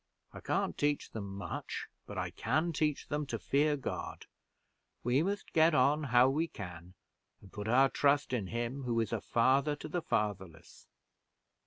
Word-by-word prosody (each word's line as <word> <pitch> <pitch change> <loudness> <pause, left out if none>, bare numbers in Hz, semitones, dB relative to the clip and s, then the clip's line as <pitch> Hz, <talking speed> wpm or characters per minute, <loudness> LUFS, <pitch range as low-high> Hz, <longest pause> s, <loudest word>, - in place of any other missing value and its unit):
I - - -8
can't - - -1
teach 145 0 0
them 100 -3 -6
much; 100 - -5 0.2
but - - -7
I - - -2
can 155 +10 0
teach 150 -1 0
them 150 0 -2
to 115 - -2
fear 145 +9 +2
God. 135 - -5 0.8
We 125 +4 +3
must 200 +4 -3
get 160 0 +5
on 145 +3 +3
how 125 -1 +5
we 155 +5 +1
can, 90 - -9 0.4
and 95 - -17
put 105 0 -5
our 130 +4 +5
trust 145 -2 +2
in 110 -6 -1
Him 120 +5 -3
who 120 -3 0
is 115 0 -1
a 110 - -1
father 135 +5 +2
to - - -8
the 175 +3 -2
fatherless." 95 - -3
130 Hz, 170 wpm, -32 LUFS, 110-150 Hz, 0.8 s, get